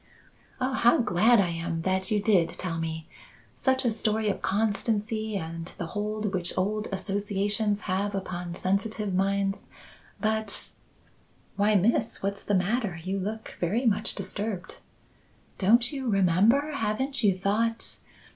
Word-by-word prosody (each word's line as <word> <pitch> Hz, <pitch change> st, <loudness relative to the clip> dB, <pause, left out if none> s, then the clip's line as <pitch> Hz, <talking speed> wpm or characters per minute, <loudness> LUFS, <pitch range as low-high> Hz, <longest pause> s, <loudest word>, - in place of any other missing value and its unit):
"Oh, 260 Hz, +1 st, 0 dB
how 240 Hz, -2 st, +5 dB
glad 225 Hz, +2 st, +4 dB
I 185 Hz, -3 st, +3 dB
am 165 Hz, 0 st, -3 dB
that 190 Hz, +1 st, 0 dB
you 210 Hz, -, +2 dB
did 190 Hz, -6 st, +3 dB
tell 165 Hz, -3 st, -3 dB
me! 160 Hz, 0 st, -4 dB, 0.5 s
Such 260 Hz, 0 st, +1 dB
a 240 Hz, -, +3 dB
story 215 Hz, 0 st, 0 dB
of 200 Hz, -, -2 dB
constancy 215 Hz, +1 st, 0 dB
and 165 Hz, -1 st, -5 dB
the 170 Hz, -, -3 dB
hold 210 Hz, 0 st, -2 dB
which 180 Hz, -2 st, -1 dB
old 210 Hz, +3 st, 0 dB
associations 205 Hz, +2 st, -1 dB
have 200 Hz, +2 st, -1 dB
upon 180 Hz, -2 st, -4 dB
sensitive 200 Hz, +2 st, -1 dB
minds! 195 Hz, +1 st, +1 dB, 0.6 s
But 220 Hz, -1 st, 0 dB, 0.4 s
" -, -, -35 dB
"Why, 210 Hz, +1 st, +3 dB
Miss? 220 Hz, +3 st, +1 dB
What's 200 Hz, 0 st, -2 dB
the 205 Hz, -, 0 dB
matter? 195 Hz, -1 st, 0 dB
You 190 Hz, +2 st, -2 dB
look 215 Hz, +3 st, -5 dB
very 210 Hz, +9 st, 0 dB
much 215 Hz, -2 st, +1 dB
disturbed." 205 Hz, -3 st, -4 dB, 0.8 s
"Don't 235 Hz, +5 st, +4 dB
you 270 Hz, -4 st, -3 dB
remember? 205 Hz, -, +3 dB
Haven't 265 Hz, +1 st, -1 dB
you 195 Hz, -3 st, +4 dB
thought? 225 Hz, +4 st, -1 dB
205 Hz, 140 wpm, -27 LUFS, 185-220 Hz, 0.8 s, how